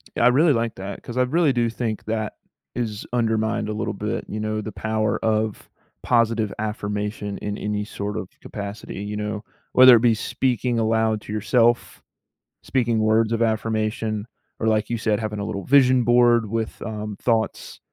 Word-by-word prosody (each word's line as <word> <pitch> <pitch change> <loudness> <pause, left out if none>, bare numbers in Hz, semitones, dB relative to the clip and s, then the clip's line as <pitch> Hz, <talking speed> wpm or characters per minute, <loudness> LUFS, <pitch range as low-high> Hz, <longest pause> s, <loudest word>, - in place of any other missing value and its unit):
Yeah, - - +1
I - - +7
really 145 +5 +5
like 115 -2 -1
that 95 +1 -7
'cause 120 - -7
I 125 - +4
really 155 +2 +2
do 120 -1 +1
think 115 -2 -3
that 110 -1 -2 0.4
is 110 -4 -3
undermined 110 -2 0
a 105 - -2
little 105 - -2
bit, - - -3
you 110 - -5
know, 110 0 -2
the 110 - -6
power 110 +1 -1
of 110 -1 -1 0.3
positive 115 -3 +2
affirmation 105 -1 -3
in 105 0 -4
any 105 0 -2
sort 105 0 -5
of 90 - -5
capacity, 100 -1 -7
you 105 0 -4
know. 105 0 -3 0.3
Whether 130 -1 +9
it 115 - +3
be 120 -1 +4
speaking 120 +1 -1
aloud 110 -1 +1
to 105 - -7
yourself, 115 +3 +1 0.6
speaking 120 -4 +1
words 110 +1 +3
of 115 0 0
affirmation, 110 -1 -1 0.3
or 110 - 0
like 110 -1 +1
you 120 - -1
said, 110 -1 0
having 105 -2 -3
a 100 - -3
little 100 -3 -4
vision 130 -2 +5
board 120 -2 +4
with, 115 0 -3
um, 105 -1 -5
thoughts 115 -2 -1
110 Hz, 175 wpm, -23 LUFS, 105-115 Hz, 0.6 s, Whether